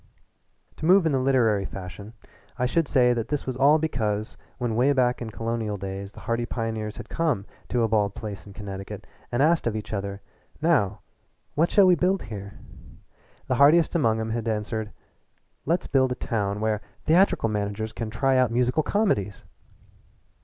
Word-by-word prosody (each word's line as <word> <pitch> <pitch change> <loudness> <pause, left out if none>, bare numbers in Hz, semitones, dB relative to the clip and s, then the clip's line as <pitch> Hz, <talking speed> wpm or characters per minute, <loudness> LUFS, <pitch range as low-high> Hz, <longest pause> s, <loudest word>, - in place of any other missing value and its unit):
To 155 - -2
move 185 0 +6
in 160 - +2
the 135 - +2
literary 120 -6 +2
fashion 100 +4 -8 0.4
I 125 - +1
should 160 +5 +1
say 125 -3 +4
that 115 -1 -2
this 145 +1 -2
was 130 - -3
all 140 +4 +5
because 110 -9 -2 0.2
when 120 -3 -2
way 130 +5 +3
back 125 -2 +1
in 115 - -4
colonial 115 -1 -3
days 100 +1 -6
the - - -12
hardy 120 0 -2
pioneers 110 -2 -3
had 120 -2 -8
come 150 -12 -1 0.2
to 120 -2 +1
a - - +3
bald 105 -2 +1
place 100 -3 -7
in 100 - -11
Connecticut 95 -1 -7 0.3
and 120 +3 +2
asked 165 -3 +3
of 115 - -1
each 110 0 -5
other, 100 0 -4 0.4
"Now, 130 - +2 0.5
what 165 +4 +2
shall 200 - +5
we 185 - +6
build 185 +2 +1
here?" 100 -2 -8 0.9
the - - -1
hardiest 155 +3 +6
one 170 - +1
among 110 -3 +2
'em 110 - -3
had 115 0 -3
answered: 110 0 -2 0.8
"Let's 170 +3 +1
build 130 -2 +2
a - - -1
town 105 -4 -2
where 110 -1 0 0.2
theatrical 170 - +3
managers 105 +1 -3
can 115 -2 -4
try 130 +4 +1
out 130 -2 +4
musical 125 +5 +1
comedies!" 145 - 0
115 Hz, 180 wpm, -25 LUFS, 105-135 Hz, 0.9 s, move